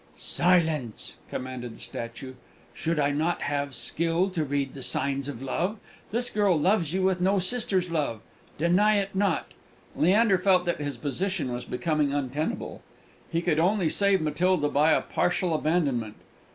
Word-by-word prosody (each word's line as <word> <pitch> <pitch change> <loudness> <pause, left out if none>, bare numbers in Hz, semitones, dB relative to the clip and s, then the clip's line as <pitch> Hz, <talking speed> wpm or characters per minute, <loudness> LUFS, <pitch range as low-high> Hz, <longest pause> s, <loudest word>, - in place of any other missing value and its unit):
"Silence!" 160 -10 +1
commanded 125 -2 -5
the - - -14
statue. 115 +3 -6 0.4
"Should 165 0 -2
not 150 +4 +1
I - - -6
have 140 -2 -2
skill 170 +7 0
to 170 -4 -1
read 140 -2 -2
the 140 - -9
signs 140 +1 -1
of 135 -3 -6
love? 180 +10 -1 0.3
This 240 +3 0
girl 200 -6 +2
loves 175 -1 +2
you 190 +1 0
with 185 -1 +1
no 195 +2 +3
sister's 185 -2 0
love. 145 -9 -1 0.4
Deny 185 +7 +3
it 200 -1 -1
not!" 190 -3 0 0.4
Leander 195 +2 +4
felt 185 -1 +3
that 175 -3 -1
his 145 -1 -3
position 155 -2 -2
was 120 - -5
becoming 150 +3 0
untenable; 145 +2 -3 0.5
he 165 +1 0
could 160 -3 +1
only 180 0 +2
save 200 0 +3
Matilda 155 +1 +1
by 150 +3 +3
a - - +3
partial 175 -1 0
abandonment. 145 -9 0
165 Hz, 155 wpm, -27 LUFS, 140-185 Hz, 0.5 s, Leander